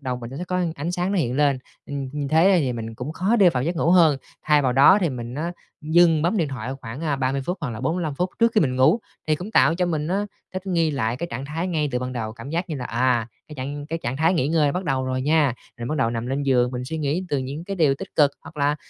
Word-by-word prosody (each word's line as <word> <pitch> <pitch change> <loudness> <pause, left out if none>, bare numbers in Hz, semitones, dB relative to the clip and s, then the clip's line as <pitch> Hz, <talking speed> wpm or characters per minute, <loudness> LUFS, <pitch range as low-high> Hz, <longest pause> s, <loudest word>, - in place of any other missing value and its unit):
đầu 130 -3 -3
mình 120 -1 -8
nó 135 - -7
sẽ 175 - -4
có 180 0 -1
ánh 160 +4 -3
sáng 180 +2 -1
nó 195 - +1
hiện 125 -4 0
lên, 140 -3 +3 0.3
ừm, 140 -2 -4
như 145 -1 -3
thế 180 +4 +5
thì 130 -3 0
mình 115 -1 -6
cũng 130 +6 -5
khó 200 +8 +1
để 190 -5 +6
vào 125 -5 -1
giấc 170 +4 -2
ngủ 165 0 +2
hơn. 165 -5 +6 0.3
Thay 150 -1 +3
vào 125 -2 +2
đó 140 +10 +7
thì 175 - +2
mình 120 -2 -6
á 165 +4 -3 0.3
dừng 160 0 +4
bấm 180 +6 +1
điện 160 -6 +1
thoại 130 -2 -5
khoảng, 115 +4 -7
à, 155 -4 0
30 135 +1 -1
phút 180 +1 -2
hoặc 140 -6 -3
là 110 - -6
45 160 +2 -1
phút 180 +5 -1
trước 230 0 +4
khi 215 - +5
mình 130 -5 +1
ngủ, 155 - +4 0.3
thì 155 - +3
cũng 185 +6 -7
tạo 165 - +4
cho 180 0 0
mình 155 -2 -1
á 200 +3 0 0.3
thích 185 +1 -5
nghi 170 -4 +1
lại 125 -5 -1
cái 170 - -4
trạng 135 - -4
thái 160 +5 -3
ngay 155 -4 0
từ 125 - +1
ban 125 0 -4
đầu, 110 -3 -4
cảm 135 +4 -9
giác 170 +3 -2
như 155 - -3
là, 130 - -5
à, 120 -1 +1 0.2
cái 150 - -9
trạng 145 +2 -5
cái 165 +1 -3
trạng 120 +2 -2
thái 165 +5 +3
nghỉ 145 -3 +1
ngơi 155 -3 +2
bắt 185 +1 -3
đầu 135 -3 0
rồi 130 0 -2
nha, 150 -3 +3 0.2
rồi 120 0 -5
bắt 155 - -1
đầu 115 -3 +2
nằm 115 0 -3
lên 135 +3 -1
giường 125 -3 +2
mình 125 0 -4
suy 160 +4 -4
nghĩ 150 +5 -1
từ 145 - 0
những 140 +5 -5
cái 195 +1 -5
điều 150 -6 +3
tích - - -9
cực, 145 -2 +5
hoặc - - -13
là 145 +1 +1
145 Hz, 295 wpm, -23 LUFS, 130-170 Hz, 0.3 s, đó